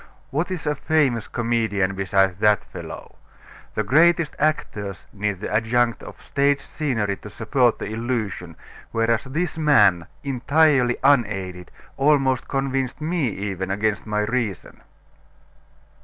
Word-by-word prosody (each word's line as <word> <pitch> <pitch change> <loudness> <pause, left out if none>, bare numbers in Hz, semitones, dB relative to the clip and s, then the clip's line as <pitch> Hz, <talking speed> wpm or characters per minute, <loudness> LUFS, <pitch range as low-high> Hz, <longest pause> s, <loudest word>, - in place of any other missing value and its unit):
What 155 +6 -1
is 185 -4 -4
a 150 - +1
famous 145 -8 +1
comedian 110 -5 0
beside 95 -1 +1
that 105 -1 +3
fellow? - - -10 0.6
The 110 - 0
greatest 160 +7 +3
actors 105 - -2
need 100 -2 -2
the - - -4
adjunct 115 +2 +1
of - - -11
stage 140 0 +1
scenery 115 -9 -2
to 105 - -11
support 120 +3 +1
the - - -5
illusion, 110 -6 -3 0.4
whereas 115 +1 +1
this 160 +5 -2
man, 105 - +4 0.2
entirely 140 -1 +2
unaided, 100 - +1 0.3
almost 135 -2 +2
convinced 135 -1 -2
me 160 -2 0
even 95 -3 -4
against 105 +1 -1
my 105 0 0
reason." 110 -5 -3
115 Hz, 125 wpm, -23 LUFS, 100-140 Hz, 0.6 s, man